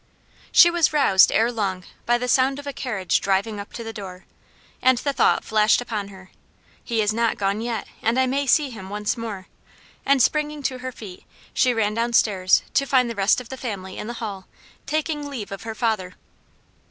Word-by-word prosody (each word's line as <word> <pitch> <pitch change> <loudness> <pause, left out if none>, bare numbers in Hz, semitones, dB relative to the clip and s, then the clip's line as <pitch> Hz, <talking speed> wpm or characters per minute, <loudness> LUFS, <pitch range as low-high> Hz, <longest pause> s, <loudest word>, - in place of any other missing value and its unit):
She 345 - +7
was 340 -2 +2
roused 195 -11 +5
ere 230 +2 +2
long 195 -5 -2 0.2
by 240 0 +4
the 250 +1 -3
sound 265 +2 +2
of 285 - -9
a 285 - -5
carriage 210 -10 -1
driving 200 +2 0
up 200 - -8
to 230 - -6
the 225 0 -7
door, 190 -4 -9 0.6
and 260 -1 +4
the 280 +3 -2
thought - - +2
flashed 215 0 +3
upon 215 -5 -4
her, 190 -2 -14 0.5
"He 230 -3 0
is 210 +1 +1
not 230 0 0
gone 200 +2 -1
yet, 235 -1 -3 0.2
and 230 +3 +1
I 260 - +4
may 275 +2 -1
see 290 -1 +3
him 190 -5 -9
once 210 +2 -2
more;" 220 -5 -6 0.6
and 275 0 +3
springing 300 +3 +1
to 255 -1 -2
her 255 0 -5
feet, 205 -7 -11 0.3
she 255 - +3
ran 215 -3 0
downstairs, 215 -5 +2
to 275 - +1
find 255 -3 +2
the - - -6
rest 200 +3 +3
of 250 - -11
the 265 - -7
family 195 -7 -6
in - - -6
the 240 - -4
hall, 205 -5 -6 0.4
taking 300 0 -2
leave 235 -9 -6
of 195 - -6
her 225 -1 -6
father. 215 -6 -1
230 Hz, 200 wpm, -23 LUFS, 200-260 Hz, 0.6 s, She